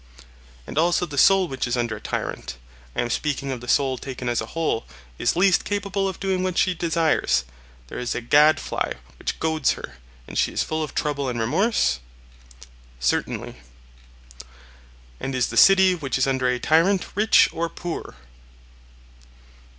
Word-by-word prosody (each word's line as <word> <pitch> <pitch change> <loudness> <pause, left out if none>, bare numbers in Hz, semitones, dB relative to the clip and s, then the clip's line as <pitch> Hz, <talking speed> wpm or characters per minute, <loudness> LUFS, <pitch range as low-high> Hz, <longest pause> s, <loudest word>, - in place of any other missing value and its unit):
And 150 - -3
also 175 +2 +2
the 150 -4 -8
soul 195 +2 +5
which 135 -4 -3
is 120 +1 -1
under 120 -2 -1
a - - -13
tyrant 60 - -4 0.4
(I - - +1
am 120 - -3
speaking 140 -1 -2
of 125 -2 -5
the 120 - -10
soul 135 -1 +1
taken 125 -2 -5
as 120 - 0
a - - -6
whole) 160 -8 -1 0.3
is 120 - +1
least 185 +1 +3
capable 200 -1 -1
of 190 - -8
doing 190 -2 -1
what 185 -1 -2
she 185 - +3
desires; 165 - +1 0.4
there - - -7
is 125 -1 -3
a - - -1
gadfly 150 +6 +3 0.3
which - - -4
goads 160 -3 +1
her, - - -10 0.3
and - - -3
she - - +2
is - - 0
full 155 0 -3
of 155 - -5
trouble 145 -3 -1
and 120 -1 -3
remorse? 135 - +1 1.0
Certainly. 60 0 -2 1.6
And 135 - -4
is 125 -2 +1
the 115 - -6
city 190 +6 +6
which 140 -8 -2
is 135 - +2
under 130 -1 0
a 125 0 +1
tyrant 170 +8 +2
rich 215 +2 +5
or 165 +1 -2
poor? 170 - -6
150 Hz, 165 wpm, -23 LUFS, 125-180 Hz, 1.6 s, city